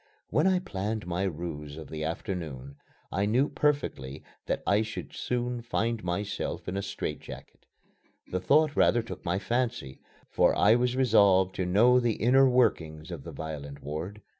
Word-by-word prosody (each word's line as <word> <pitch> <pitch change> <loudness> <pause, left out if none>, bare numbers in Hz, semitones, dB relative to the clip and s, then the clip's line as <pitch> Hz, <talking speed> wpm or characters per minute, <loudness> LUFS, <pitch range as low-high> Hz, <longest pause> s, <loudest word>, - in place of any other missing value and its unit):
When 150 - +3
I 190 -1 +4
planned 110 - -3
my 90 +1 -2
ruse 75 -4 -5
of 80 - -8
the 80 -1 -4
afternoon, 75 -5 -5 0.3
I 100 +1 0
knew 125 +7 +2
perfectly 80 - -1 0.2
that - - -1
I 100 +1 +3
should 110 -1 -6
soon 125 0 -2
find 115 -1 -1
myself 100 +3 -3
in 90 - -3
a 100 - -1
strait 100 -6 -4
jacket. - - -12 0.6
The 90 - -3
thought 150 +8 +3
rather 120 - +3
took 115 - -8
my 90 0 0
fancy, 120 - -2 0.3
for - - +3
I 105 +2 +6
was 125 +1 +1
resolved 100 -7 +4
to 95 - -1
know 120 +7 +5
the 120 -2 +1
inner 130 +4 +4
workings 85 -10 +1
of 80 -6 -6
the - - -8
violent 70 -3 -7
ward. 85 +8 -6
100 Hz, 165 wpm, -28 LUFS, 80-120 Hz, 0.6 s, I